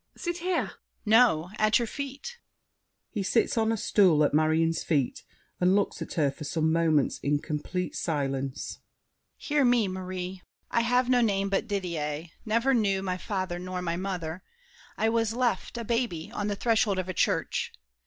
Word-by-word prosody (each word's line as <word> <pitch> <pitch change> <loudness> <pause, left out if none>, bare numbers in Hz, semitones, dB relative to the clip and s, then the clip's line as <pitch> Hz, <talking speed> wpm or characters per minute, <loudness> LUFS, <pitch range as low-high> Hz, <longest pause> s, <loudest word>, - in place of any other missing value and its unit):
Sit 345 -1 -3
here! 360 0 +1
DIDIER. - - -9 0.3
No! 215 -7 +4
at 215 0 +4
your 240 - 0
feet. 280 - -6 0.7
[He 210 - -2
sits 195 +4 +1
on 225 -1 +2
a 225 - 0
stool 180 -7 +4
at 145 - +2
Marion's 160 +2 +2
feet 145 -6 0 0.4
and 180 +2 +4
looks 205 - 0
at - - -5
her 145 -5 +2
for 150 - -9
some 160 +1 0
moments 160 -4 +2
in 145 +1 +1
complete 155 +5 -3
silence. 135 -4 -2 0.6
Hear 295 -1 +1
me, 240 -4 +4
Marie! 185 0 -5 0.3
I 235 - +3
have 245 +2 +2
no 250 -1 +4
name 200 -3 +1
but 195 - 0
Didier—never 180 - -1
knew 200 -5 +2
My 185 -1 -1
father 185 -3 -3
nor 180 0 -4
my 170 -1 -1
mother. 180 -2 -4 0.6
I 220 - +2
was 225 -1 +1
left, 240 -2 -1
A 235 - -3
baby, 230 -8 -2
on 205 - -3
the 205 - -1
threshold 220 -2 +2
of 185 -1 -2
a 185 - -3
church. - - 0
190 Hz, 170 wpm, -28 LUFS, 165-230 Hz, 0.7 s, No